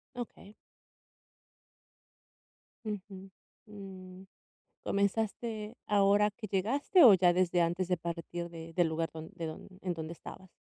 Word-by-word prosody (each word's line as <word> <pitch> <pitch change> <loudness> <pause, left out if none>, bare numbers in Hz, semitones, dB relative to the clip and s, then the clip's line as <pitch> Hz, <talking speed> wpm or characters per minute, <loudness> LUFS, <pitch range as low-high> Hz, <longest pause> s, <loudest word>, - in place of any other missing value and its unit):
Okey. 215 -4 -8 2.3
Ujú, 195 -2 -6 0.4
mm, 190 -2 -10 0.6
¿comenzaste 215 +2 -1
ahora 205 0 +4
que 215 +1 -8
llegaste 265 - +3
o 225 -5 +10
ya 180 -1 +5
desde 175 -1 +2
antes 175 +2 0
de 180 -1 +1
partir 170 +1 -5
de 165 -1 -9
del 175 -1 +3
lugar 165 +1 -1
don 160 0 -8
de 165 - -4
don 155 - -7
en 180 -2 -1
donde 160 0 -6
estabas? 190 +2 -11
190 Hz, 125 wpm, -32 LUFS, 170-210 Hz, 2.3 s, o